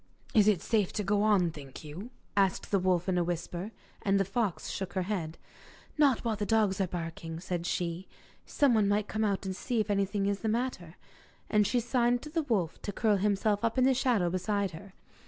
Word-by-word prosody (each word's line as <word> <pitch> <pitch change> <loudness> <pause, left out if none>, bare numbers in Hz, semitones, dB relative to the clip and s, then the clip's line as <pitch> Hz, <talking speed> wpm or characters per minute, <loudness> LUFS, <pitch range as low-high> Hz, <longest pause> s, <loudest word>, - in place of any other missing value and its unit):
'Is 210 -2 +5
it 205 -5 +3
safe 215 -5 +1
to 210 - -1
go 205 +1 +1
on, 200 -5 +3
think 140 -2 -10
you?' 165 +10 -8 0.3
asked 195 -2 +1
the 200 - +3
wolf 180 -1 +1
in 180 -1 +2
a - - +2
whisper. 175 +3 -4 0.3
And 195 0 +2
the 195 - +2
fox 195 -1 -1
shook 185 -2 -4
her 185 - 0
head. 175 -5 -3 0.6
'Not 280 -6 +3
while 225 -2 +1
the 210 - -3
dogs 205 -3 +2
are 190 - +1
barking,' 165 -1 -5
said 175 -1 -3
she; 175 +1 -2 0.4
'someone 230 -8 +3
might 205 +1 +1
come 220 0 -1
out 200 -2 0
to 190 -1 -3
see 235 +5 -2
if 210 -1 0
anything 200 0 0
was 200 0 0
the 220 - -1
matter.' 215 -8 -2 0.6
And 210 -2 +4
she 245 - +2
signed 240 0 +1
to 300 - -8
the 325 +1 +1
wolf 205 - -1
to 205 - -4
curl 210 0 +2
himself 205 +1 +1
up 230 +2 0
in 255 - +4
the 265 +1 +5
shadow 235 -9 +1
beside 195 +1 -1
her. 185 +4 -11
200 Hz, 210 wpm, -30 LUFS, 180-220 Hz, 0.6 s, Is